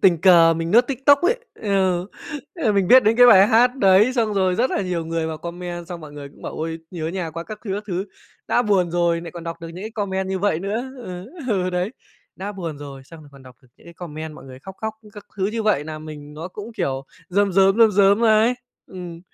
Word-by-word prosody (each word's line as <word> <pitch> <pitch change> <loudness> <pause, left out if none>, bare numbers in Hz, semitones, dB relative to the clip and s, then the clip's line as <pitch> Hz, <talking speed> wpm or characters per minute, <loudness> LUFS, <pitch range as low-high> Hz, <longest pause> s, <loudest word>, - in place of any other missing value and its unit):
tình 170 -4 +4
cờ 165 -3 +6
mình 165 +1 -3
lướt 240 +4 +5
TikTok 275 +1 +4
ấy. 430 +7 +3 0.2
Ừ, 190 -3 0 0.5
ờ, 280 - 0
mình 195 -3 +1
biết 260 0 +8
đến 220 +2 +3
cái 245 0 +8
bài 195 -4 +8
hát 245 +4 +4
đấy, 200 +2 +5
xong 225 -4 0
rồi 185 -2 +2
rất 245 +7 +1
là - - -1
nhiều 180 -3 -2
người 165 0 -2
vào 160 -1 -5
comment, 175 +1 -6
xong 175 -1 -7
mọi 150 -2 -11
người 145 -1 -9
cũng - - -20
bảo: - - -5
"Ôi, 165 +1 -4
nhớ 160 -3 -4
nhà 170 -2 -4
quá 165 +2 -6
các 215 -1 -8
thứ, 200 - -3
các 210 +1 -5
thứ". 185 -1 -2 0.4
Đã 245 - +3
buồn 195 -5 +1
rồi 170 -1 +1
nại 170 -1 -8
còn 170 0 -9
đọc 165 0 -6
được 165 - -7
những 175 +3 -9
cái 220 - -5
comment 190 -3 -3
như 190 0 -2
vậy 200 -4 +1
nữa. 220 +7 -3
Ừ, 185 -6 -8 0.2
ừ, 185 -4 0
đấy. 180 +3 -1 0.5
Đã 200 +2 -5
buồn 165 -6 -6
rồi 140 -2 -9
xong 165 +3 -13
rồi 150 - -15
còn 140 -1 -15
đọc 130 -1 -15
được 130 - -23
những - - -21
cái 170 - -13
comment 155 -2 -7
mọi 135 - -13
người 130 -1 -11
khóc, 190 +8 -11
khóc 220 0 -3 0.2
các 205 -2 -12
thứ 190 -1 0
như 220 +2 -2
vậy, 200 -9 +1
làm 155 0 -7
mình 150 -1 -10
nó 165 +4 -6
cũng, 210 +5 -9
kiểu, 135 -7 -2 0.2
rơm 200 +1 +1
rớm, 195 +2 +4
rơm 225 -2 +7
rớm 200 +2 +4
ấy. 220 +2 +4 0.3
Ừm. 175 -2 -9
185 Hz, 255 wpm, -22 LUFS, 165-210 Hz, 0.5 s, biết